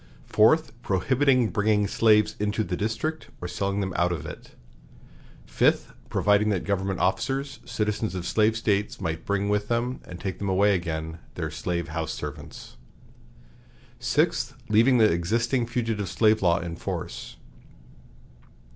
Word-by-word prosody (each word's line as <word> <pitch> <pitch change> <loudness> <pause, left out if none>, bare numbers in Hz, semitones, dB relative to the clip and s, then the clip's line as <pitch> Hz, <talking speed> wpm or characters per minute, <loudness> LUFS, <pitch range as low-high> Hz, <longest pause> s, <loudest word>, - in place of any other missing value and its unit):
Fourth. 155 +10 +4
Prohibiting 125 +4 +2
bringing 105 0 +2
slaves 105 +1 +3
into 105 +1 0
the 90 - -3
District, 115 - -3
or 90 - -5
selling 100 +2 -2
them 95 -2 -3
out 85 0 +2
of 80 -4 -4
it. - - -10 0.9
Fifth. - - +1 0.2
Providing 105 +1 +3
that 95 -4 0
government 95 -1 -1
officers, 135 +8 -1
citizens 105 -1 -2
of 90 -2 -4
slave 110 +3 +2
States, 105 -2 0
might 80 0 -4
bring 100 0 0
with 105 0 0
them 120 +2 -1
and 90 -1 -9
take 95 -2 -5
away 100 +1 +3
again, 80 -2 -3 0.2
their 80 -3 -3
slave 85 +1 -3
house 80 0 -3
servants. - - -8 1.2
Sixth. - - +1
Leaving 115 +4 +5
the 110 - +6
existing 115 +7 +1
fugitive 115 -5 -2
slave 110 +4 +3
law 85 -2 +3
in 85 -1 -5
force. - - -5
105 Hz, 140 wpm, -26 LUFS, 90-115 Hz, 1.2 s, the